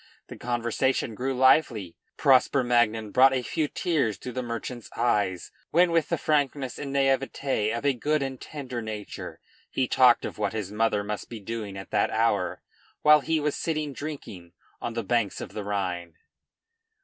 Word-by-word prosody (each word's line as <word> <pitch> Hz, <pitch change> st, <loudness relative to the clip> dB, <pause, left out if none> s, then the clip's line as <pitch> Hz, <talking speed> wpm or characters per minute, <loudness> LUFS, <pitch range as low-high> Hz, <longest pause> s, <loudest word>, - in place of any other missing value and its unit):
The -, -, -8 dB
conversation 120 Hz, +1 st, -1 dB
grew 130 Hz, +4 st, -2 dB
lively. 125 Hz, -, +3 dB, 0.2 s
Prosper 135 Hz, -1 st, +4 dB
Magnan 115 Hz, -3 st, +2 dB
brought 135 Hz, +3 st, +6 dB
a 130 Hz, -, -1 dB
few 155 Hz, +4 st, -1 dB
tears 145 Hz, -, 0 dB
to 125 Hz, -, -7 dB
the 130 Hz, +1 st, -3 dB
merchant's 120 Hz, 0 st, -6 dB
eyes, 100 Hz, -6 st, 0 dB, 0.2 s
when 175 Hz, +2 st, +4 dB
with 165 Hz, -3 st, +2 dB
the 170 Hz, -, +1 dB
frankness 140 Hz, -3 st, 0 dB
and 140 Hz, -1 st, -5 dB
naivete 135 Hz, -4 st, +1 dB
of 115 Hz, +5 st, -3 dB
a 140 Hz, -, +4 dB
good 145 Hz, +4 st, 0 dB
and 135 Hz, -2 st, -5 dB
tender 130 Hz, -5 st, -6 dB
nature, 110 Hz, -2 st, -7 dB, 0.3 s
he 130 Hz, -, 0 dB
talked 125 Hz, -1 st, +5 dB
of -, -, -6 dB
what 105 Hz, -1 st, 0 dB
his 105 Hz, -3 st, -4 dB
mother 105 Hz, -1 st, +1 dB
must 105 Hz, 0 st, -5 dB
be 115 Hz, -, -7 dB
doing 105 Hz, -1 st, -5 dB
at 95 Hz, -, -9 dB
that -, -, +2 dB
hour, -, -, 0 dB, 0.4 s
while 150 Hz, 0 st, +8 dB
he 160 Hz, +2 st, 0 dB
was 150 Hz, -1 st, -1 dB
sitting 155 Hz, -3 st, -2 dB
drinking 120 Hz, -, -8 dB, 0.3 s
on 115 Hz, -, -4 dB
the 115 Hz, -, -2 dB
banks 110 Hz, -1 st, 0 dB
of -, -, -6 dB
the 105 Hz, -, -4 dB
Rhine. 90 Hz, -5 st, -3 dB
120 Hz, 175 wpm, -26 LUFS, 105-140 Hz, 0.4 s, while